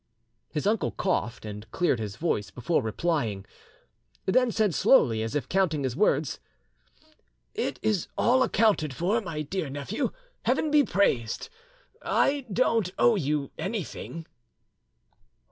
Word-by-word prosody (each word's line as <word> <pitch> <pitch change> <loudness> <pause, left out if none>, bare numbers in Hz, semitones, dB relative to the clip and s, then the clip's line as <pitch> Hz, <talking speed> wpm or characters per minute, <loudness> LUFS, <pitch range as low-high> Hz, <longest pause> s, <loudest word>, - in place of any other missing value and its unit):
His 150 - -3
uncle 215 +2 +1
coughed 120 - -2
and 105 0 -8
cleared 165 -3 +1
his 105 -2 -4
voice 105 - -1
before 125 - 0
replying, 110 - -1 0.8
then 250 +5 +3
said 215 -4 +1
slowly, 120 - +4
as 110 +5 -3
if 145 - -1
counting 170 -6 +1
his 130 -2 -2
words— 155 -5 +1 1.1
"It - - -2
is 210 -5 +1
all 255 +2 +4
accounted 205 - +2
for, 200 - +1
my 165 -6 -4
dear 165 0 -3
nephew; 145 - -2 0.4
Heaven 310 - +1
be 295 -1 +6
praised! 125 - 0 0.5
I 275 -2 +1
don't 225 -3 +2
owe 235 - +5
you 150 -5 -1
anything." 185 -5 -5
165 Hz, 130 wpm, -27 LUFS, 130-215 Hz, 1.1 s, be